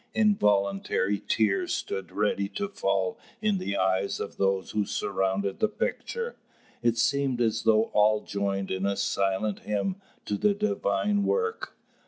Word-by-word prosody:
Involuntary 100 - +2
tears 105 -3 +2
stood 95 -3 -4
ready 100 -1 0
to 200 - -3
fall 95 - -1 0.2
in 210 -3 +1
the 100 - -2
eyes 95 +1 +1
of - - -5
those 95 -1 +1
who 105 - +1
surrounded 95 0 -1
the 220 - +3
picture. 470 - -3 0.5
It 120 -1 +2
seemed 135 +1 +1
as 115 -2 +1
though 110 0 +4
all 105 0 +4
joined 100 -1 -2
in 95 +1 0
a 100 - 0
silent 100 +1 0
hymn 105 - -2 0.3
to 105 - -1
the 210 -1 +3
divine 205 - +1
work. 450 - -1
105 Hz, 145 wpm, -27 LUFS, -, 0.5 s, though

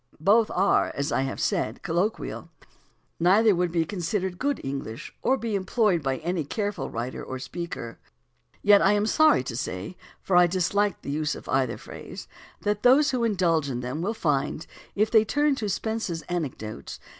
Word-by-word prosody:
Both 210 +7 +4
are, 195 +2 +2
as 140 +1 -2
I - - +1
have 135 0 -3
said, 110 +3 -1
colloquial; 185 +4 -2 0.7
neither 200 +5 +5
would 175 -1 0
be 165 -1 +1
considered 185 0 -3
good 285 +1 0
English 135 -4 -5
or 265 +2 +2
be 225 -2 -3
employed 195 -2 +1
by 135 -2 -1
any 170 0 -2
careful 205 +7 -3
writer 120 +3 -5
or 130 - -5
speaker. 135 -3 -6 0.6
Yet 205 0 +7
I 195 - +4
am 205 0 +2
sorry 310 - +4
to 125 -2 -5
say, 100 - -4 0.2
for 190 - -1
I 175 0 +7
dislike 190 +3 0
the - - -4
use 150 0 -1
of - - -11
either 135 -1 0
phrase, - - -10 0.3
that 205 0 -1
those 275 +4 +5
who 250 -3 0
indulge 175 -9 +1
in 125 -2 -3
them 125 +6 -4
will 215 +6 -1
find, 150 -3 -1 0.3
if 215 +2 +1
they 220 -2 +6
turn 290 +5 +2
to 215 -5 -2
Spence's 195 -5 -2
Anecdotes 135 - -5
(p. - - -31
180 Hz, 180 wpm, -26 LUFS, 145-210 Hz, 0.7 s, Yet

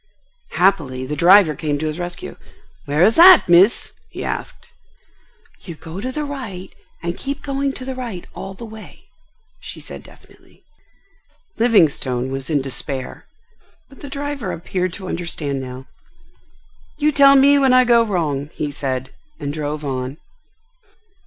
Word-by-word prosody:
Happily, 145 -9 +1
the 150 +3 -4
driver 175 +1 +6
came 150 -2 -2
to 155 - -4
his 155 +2 -3
rescue. 175 0 -6 0.5
"Where 150 +4 +2
is 220 +4 +4
that, 360 +1 +9
Miss?" 180 +6 +4 0.2
he - - -7
asked. - - -6 0.9
"You 170 - -9
go 165 +4 -9
to 255 +3 -3
the 300 +3 -3
right 225 -11 -7 0.3
and 170 0 -2
keep 280 +1 -5
going 275 0 -1
to 255 - -7
the 265 - -4
right 235 -9 -6
all 195 0 -8
the 235 - -9
way," 220 -1 -12 0.6
she - - -9
said - - -9
definitely. - - -20 1.0
Livingstone 140 - +2
was 135 +1 -5
in 145 -4 +1
despair; 135 0 -5 0.6
but 270 - -17
the 285 - -8
driver 280 -7 -4
appeared 180 +2 -3
to 190 -1 -8
understand 155 -6 -3
now. 130 0 -8 1.1
"You 300 0 +2
tell 275 -1 +6
me 280 +1 +6
when 270 -2 +3
I 255 0 +6
go 240 -1 +4
wrong," 155 -9 -2
he 150 -1 -3
said, 130 -2 -4 0.3
and 145 -2 -4
drove 150 0 -4
on. 130 0 -4
175 Hz, 150 wpm, -20 LUFS, -, 1.1 s, that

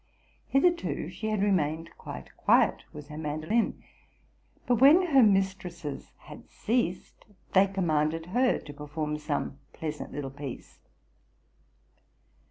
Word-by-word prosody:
Hitherto 340 +5 +1
she 220 - -4
had 215 -2 0
remained 165 -4 0
quite 65 -1 -9
quiet - - +3
with 150 0 -10
her 150 +1 -7
man 150 0 -3
dolin; 225 +8 0 0.8
but, 245 -1 +2
when 315 +7 +7
her 270 - +8
mistresses 185 - 0
had - - -13
ceased, 220 -6 -2 0.3
they 195 +1 +6
commanded 165 -4 0
her 250 +1 +3
to 145 - -10
perform 150 +1 -4
some 145 -2 -3
pleasant 155 -2 -5
little 140 -2 -5
piece. 140 -2 -8
165 Hz, 120 wpm, -28 LUFS, 150-215 Hz, 0.8 s, her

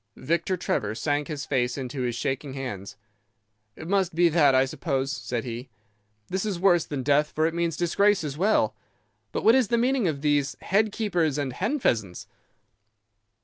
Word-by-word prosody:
"Victor 170 +6 -1
Trevor 110 - -2
sank 145 +4 -1
his 150 -3 -5
face 125 -2 0
into 130 0 -4
his 120 -2 -1
shaking 135 +2 -3
hands. 105 -8 -6 0.8
'It 160 - -9
must 190 -3 +1
be 175 0 +4
that, 150 -5 +4
I 130 +1 +4
suppose,' 135 -1 -2
said 120 -5 -3
he. 125 +1 -6 0.6
'This 190 0 -2
is 205 -5 -2
worse 175 -3 +4
than 140 -3 -4
death, 145 +2 +2
for 155 - +2
it 165 - 0
means 170 -2 -1
disgrace 195 +2 +2
as 145 -3 -4
well. 200 +7 +2 0.6
But - - -3
what 225 - +6
is 260 -3 +3
the 235 - +1
meaning 250 -2 +2
of 145 -4 -2
these 145 -2 +1
"head 210 +3 +1
keepers" 175 - 0
and 140 -3 -2
"hen 215 - -1
pheasants"? 110 - -1
150 Hz, 180 wpm, -26 LUFS, 135-185 Hz, 0.8 s, what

